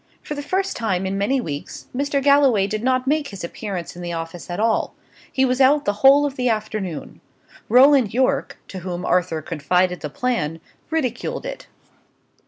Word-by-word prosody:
For - - -5
the 290 - -4
first 380 +6 -1
time 190 -5 -1
for 190 - -2
many 200 +8 +1
weeks, 145 - -6
Mr. 280 +1 0
Galloway 275 -8 +5
did 215 +2 -3
not 255 0 +1
make 295 +1 +1
his 195 -6 -8
appearance 180 -1 -5
in 175 - -9
the 175 -1 -4
office 165 +1 -6
at 175 - -4
all; 225 0 +1 0.4
he 265 - +2
was 255 +1 +1
out 285 +2 +4
the 205 - +1
whole 280 +2 +7
of 280 -1 -4
the 250 -1 +1
afternoon. 215 -7 -4 0.5
Roland 255 -1 +6
Yorke, 255 +2 0
to 190 - -6
whom 180 0 -5
Arthur 170 -4 0
confided 180 +3 0
the 150 - -5
plan, 165 - -2 0.3
ridiculed 260 - -2
it. - - -7
225 Hz, 180 wpm, -22 LUFS, 180-270 Hz, 0.5 s, whole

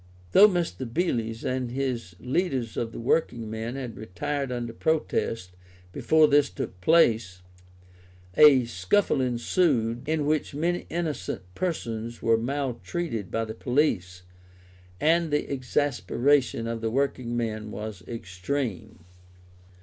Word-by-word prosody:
Though 205 - +9
Mr. 170 - -2
Beales 115 -8 -1
and 130 -1 -1
the 130 -2 -2 0.2
leaders 130 -4 -1
of 115 -1 -2
the - - -8
working 115 -3 0
men 110 +3 -4
had 130 -4 -5
retired 140 +7 -3
under 120 -2 -3
protest 115 - -1 0.4
before 155 +9 +4
this 145 -1 +4
took 90 - -6
place, 110 - +3 0.9
a 135 -2 +7
scuffle 120 - +1
ensued 120 -1 +1
in 155 -2 +1
which 150 -1 0
many 175 +4 -1
innocent 160 - -3
persons 120 - -3
were 115 0 +3
maltreated 130 - -3
by 115 0 -1
the 110 - -6
police, 110 - 0 0.8
and 165 +2 +3
the 150 0 0
exasperation 135 -1 +1
of 115 0 -3
the 115 - 0
working 130 -1 -1
men 110 -2 -3
was 105 -3 -6
extreme. 110 -1 -4
125 Hz, 120 wpm, -26 LUFS, 115-145 Hz, 0.9 s, Though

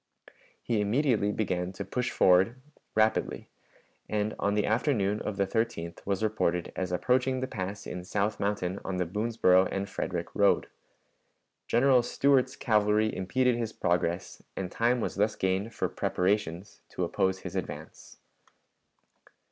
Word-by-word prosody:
He 110 -3 0
immediately 110 -1 +2
began 90 -4 -1
to 100 +1 -6
push 125 +6 -2
forward 95 +7 +4 0.4
rapidly, 110 0 +1 0.6
and 105 0 0
on 100 +1 +1
the 105 - +2
afternoon 110 -3 +1
of 105 - -4
the 100 - +2
13th 105 -5 -2
was 100 +1 0
reported 90 -5 0
as 90 -1 -2
approaching 130 +7 +1
the 130 - -1
pass 100 -4 -5
in 90 0 -6
South 105 +3 -1
Mountain 100 -2 -1
on 95 -1 -3
the 90 - 0
Boonsboro 95 -1 +3
and 100 0 -2
Frederick - - -4
road. - - +3 1.0
General 125 +1 +4
Stuart's 130 +1 +2
cavalry 105 -1 +2
impeded 120 +6 +1
his 115 -2 -3
progress, 85 0 -1 0.2
and 95 -2 -3
time 120 +1 +1
was - - -3
thus 105 +2 +2
gained 95 +4 -1
for - - -1
preparations 90 -1 -1
to 90 - -3
oppose 95 +2 0
his - - -7
advance. - - -7
105 Hz, 140 wpm, -29 LUFS, 95-115 Hz, 1.0 s, forward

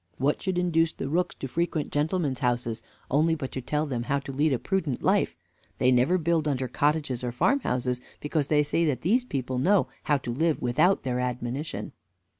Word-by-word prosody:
What 140 +3 +1
should 190 -2 -1
induce 165 -2 +2
the - - -4
rooks 175 +5 0
to 135 - -5
frequent 165 +1 -1
gentlemen's 150 -2 0
houses, 120 -3 0 0.3
only 160 +4 +3
but 135 -4 -5
to 130 - -4
tell 150 +4 -1
them 130 -5 -2
how 135 +4 0
to 140 - -7
lead 145 +3 +2
a 130 - +2
prudent 160 -5 -2
life? - - +2 0.4
they 125 - +3
never 130 +9 +4
build 165 -2 +1
under 130 -3 0
cottages 145 -1 0
or 120 - -1
farmhouses, 125 - +1 0.2
because 150 -1 -1
they 150 -1 +3
see 165 +3 0
that 145 -5 0
these 235 +8 +2
people 130 - -3
know 190 +8 +3 0.2
how 145 - +3
to 130 -3 -5
live 160 +4 +1
without 155 +11 +2
their 125 -2 -1
admonition. 125 +4 -3
145 Hz, 195 wpm, -27 LUFS, 125-165 Hz, 0.4 s, never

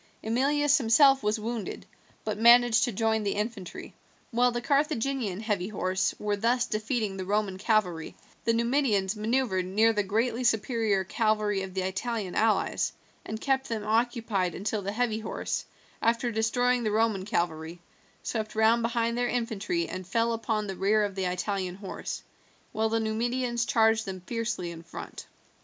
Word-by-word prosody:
Emilius 285 +6 +2
himself 270 +3 +5
was 210 +1 0
wounded, 225 -1 -4 0.4
but 215 -1 -3
managed 240 0 +6
to 245 - -2
join 220 +1 +1
the 200 -1 -1
infantry. 210 -3 -5 0.4
While 245 +1 +3
the 240 - -2
Carthaginian 270 - 0
heavy 205 -5 -1
horse 185 -2 -1
were 210 -1 -1
thus 240 +4 +1
defeating 215 -2 -2
the 190 - -3
Roman 200 -1 -1
cavalry, 190 -7 0 0.3
the 230 - +2
Numidians 230 -5 +1
maneuvered 215 -3 0
near 220 +4 +3
the 210 - +1
greatly 225 +5 0
superior 225 -3 +1
cavalry 210 0 0
of 190 -1 -7
the 190 - 0
Italian 190 +1 -3
allies, 220 0 +1 0.3
and 220 - -4
kept 265 +2 0
them 220 -3 -3
occupied 220 -4 0
until 210 +2 -2
the 200 +1 -3
heavy 220 0 0
horse, 220 - -3 0.4
after 235 +1 +1
destroying 245 +3 +1
the 220 - 0
Roman 215 -2 +1
cavalry, 170 -3 -2 0.4
swept 220 -2 -3
round 220 +2 +4
behind 230 0 0
their 245 0 0
infantry 245 - -1
and 185 -1 -6
fell 230 +4 +1
upon 220 -2 -1
the 195 -1 -5
rear 210 +3 +2
of 205 -1 -2
the 190 -1 -2
Italian 180 0 -2
horse, 195 -1 -6 0.5
while 220 0 0
the 225 +1 +1
Numidians 235 +2 -1
charged 225 -1 +3
them 190 -2 -6
fiercely 225 -3 -3
in 165 -1 -9
front. 170 0 -9
220 Hz, 160 wpm, -28 LUFS, 200-235 Hz, 0.5 s, managed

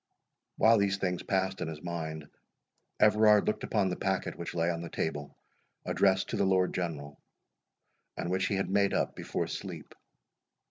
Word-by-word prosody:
While 115 0 +5
these 100 -1 +1
things 90 -2 -1
passed 95 0 -1
in - - -2
his 80 0 -7
mind, 80 -3 -5 0.7
Everard 105 0 +5
looked 105 - -1
upon 100 -4 +1
the 90 - -2
packet 95 0 -2
which 85 - -6
lay 85 +1 +1
on 85 -1 -4
the 85 - -6
table 75 -3 -4 0.5
addressed 95 -1 +2
to - - -2
the - - +2
Lord 95 -1 +2
General, 75 -5 -4 1.0
and 85 - -3
which 95 +1 +1
he 100 - 0
had 95 -1 -1
made 100 0 +2
up - - 0
before - - -3
sleep. - - -7
95 Hz, 170 wpm, -30 LUFS, 85-100 Hz, 1.0 s, While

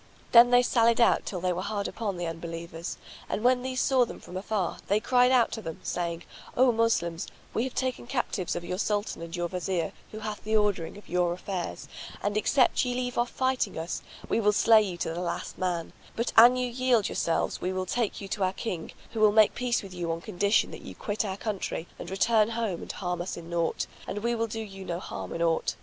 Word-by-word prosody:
Then 240 +1 +9
they 245 0 +6
sallied 235 -1 +3
out 235 - +4
till 185 - -3
they 180 0 +1
were 175 - -3
hard 205 0 -2
upon 205 -5 -3
the 175 - -3
Unbelievers 165 0 -5 0.3
and, 215 - -2
when 250 0 +4
these 255 0 -2
saw 260 -2 +4
them 240 - -6
from 180 - -11
afar, 195 -1 -1
they 205 +2 +3
cried 250 +3 +4
out 245 -3 +4
to 225 - -4
them, 160 -5 -6
saying, 170 -1 -2 0.3
"O 255 0 +6
Moslems, 200 -8 0 0.3
we 230 - +1
have 260 - -6
taken 255 -2 -2
captives 240 -8 -1
your 175 +2 -4
Sultan 205 -4 -1
and 170 +1 -6
your 175 0 -1
Wazir 180 -2 -2 0.2
who 215 - -7
hath 215 -1 -5
the 220 +1 0
ordering 200 -4 0
of 205 - -14
your 175 0 +1
affairs; 180 0 -5 0.4
and 205 0 0
except 250 +4 +3
ye 250 -1 -1
leave 250 -1 -2
off 240 0 +1
fighting 260 -6 0
us, 165 +2 -3 0.3
we - - +1
will 210 -1 +3
slay 220 +1 +6
you 190 -4 -3
to 165 - -2
the 175 - -3
last 175 - -4
man; 175 -3 -2 0.2
but 235 +1 -1
an 240 +3 +9
you 250 0 0
yield 245 -3 +2
yourselves 165 - -1
we 180 - -1
will 185 0 -2
take 235 +1 -1
you 200 - -6
to 205 - -3
our 185 0 +1
King, 185 -6 -5 0.2
who 225 - -4
will 215 -1 +6
make 215 0 +5
peace 245 -2 0
with 195 -2 -9
you 175 -2 -2
on 165 - -2
condition 200 +2 +1
that - - -8
you - - -9
quit 210 +1 -2
our 195 -2 -3
country 200 -6 -3
and - - -6
return 215 +3 +3
home 225 -6 -2
and - - -5
harm 180 -2 -3
us 180 - -4
in 170 0 -9
naught, 170 -1 0 0.2
and 205 +1 -4
we 235 0 +1
will 230 -1 0
do 225 +1 -4
you 195 -3 -8
no 175 -2 -3
harm - - -6
in 170 - -1
aught. 165 -1 +1
205 Hz, 230 wpm, -28 LUFS, 175-235 Hz, 0.4 s, Then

